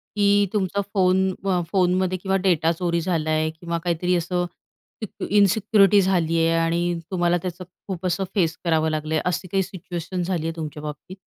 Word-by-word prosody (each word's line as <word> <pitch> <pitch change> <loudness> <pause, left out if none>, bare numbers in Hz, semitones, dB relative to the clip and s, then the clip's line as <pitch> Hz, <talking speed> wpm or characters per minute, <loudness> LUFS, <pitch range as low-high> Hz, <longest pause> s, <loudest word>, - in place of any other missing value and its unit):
की 205 0 +4
तुमचा 200 0 0
फोन 190 0 +3
म 185 -3 +1
फोनमध्ये 185 0 +2
किंवा 190 +1 -1
डेटा 165 -3 +3
चोरी 170 0 -1
झालाय 155 -3 0
आहे 155 - 0
किंवा 170 +1 -4
काहीतरी 180 +1 0
असं 175 +1 -1 0.6
सिक 210 - -7
इन्सिक्युरिटी 205 0 +4
झाली 170 -3 +1
आहे 165 0 +2
आणि 170 +1 0
तुम्हाला 175 -1 +2
त्याचं 180 0 -5 0.2
खूप 185 -1 -5
असं 180 +2 0
फेस 165 -4 +1
करावं 160 -1 +2
लागलं 155 0 -3
आहे 155 - +2
अशी 180 +1 -1
काही 195 +2 +1
सिच्युएशन 180 -1 -5
झाली 175 -3 -2
आहे 165 - -4
तुमच्या 150 -2 -6
बाबतीत? 150 +6 -8
175 Hz, 175 wpm, -23 LUFS, 165-190 Hz, 0.6 s, की